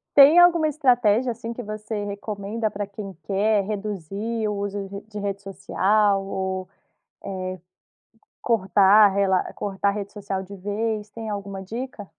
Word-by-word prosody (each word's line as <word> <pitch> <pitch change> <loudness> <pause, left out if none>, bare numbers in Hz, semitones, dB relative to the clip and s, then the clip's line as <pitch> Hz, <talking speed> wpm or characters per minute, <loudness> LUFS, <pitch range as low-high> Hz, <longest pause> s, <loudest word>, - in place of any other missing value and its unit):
Tem 290 +4 +9
alguma 345 -3 +6
estratégia, 250 -5 +3
assim, 230 0 -6
que 245 - -7
você 215 0 -5
recomenda 205 +2 -3
pra 205 0 -4
quem 200 -1 -8
quer 200 +3 +2
reduzir 210 +2 -3
o 210 - -1
uso 200 0 -3
de 200 +1 -7
de 210 -1 -6
rede 200 -1 -3
social 200 +1 +1
ou, 190 -1 -3 0.5
eh, 185 -1 -5 0.8
cortar 205 -1 +5
rela 195 -2 +3
cortar 200 0 -1
a - - +2
rede 200 0 -5
social 195 -2 -4
de 200 +2 -11
vez? 210 +2 -2
Tem 225 0 -7
alguma 200 -1 -5
dica? 230 0 -6
205 Hz, 150 wpm, -24 LUFS, 195-220 Hz, 0.8 s, Tem